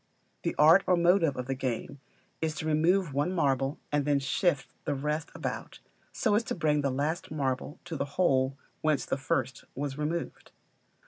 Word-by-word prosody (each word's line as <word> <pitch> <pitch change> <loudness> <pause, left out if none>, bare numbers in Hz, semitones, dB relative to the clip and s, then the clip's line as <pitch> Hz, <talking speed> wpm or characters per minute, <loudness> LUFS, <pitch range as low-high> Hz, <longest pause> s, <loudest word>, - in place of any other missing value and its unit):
The - - -2
art 160 +6 +7
or 180 - +4
motive 170 -4 +3
of 125 - -3
the 135 - -1
game 130 +1 -3 0.4
is 160 -1 -1
to 155 - -4
remove 160 +2 +2
one 145 +6 +1
marble 135 -5 +1
and 145 -1 +2
then 145 0 +2
to 135 - -3
shift 170 -1 0
the 145 - -1
rest 150 +3 -2
about, - - -5 0.3
so 220 - +1
as 215 +3 +3
to - - -2
bring 150 -3 +2
the 140 - +1
last 145 +6 -2
marble 140 +1 -2
to 170 -2 -5
the 140 - -1
hole 135 -6 +2 0.2
whence 155 -2 +1
the - - 0
first 130 -2 -1
was 140 +1 -4
removed. 160 +3 -3
150 Hz, 185 wpm, -29 LUFS, 135-165 Hz, 0.4 s, art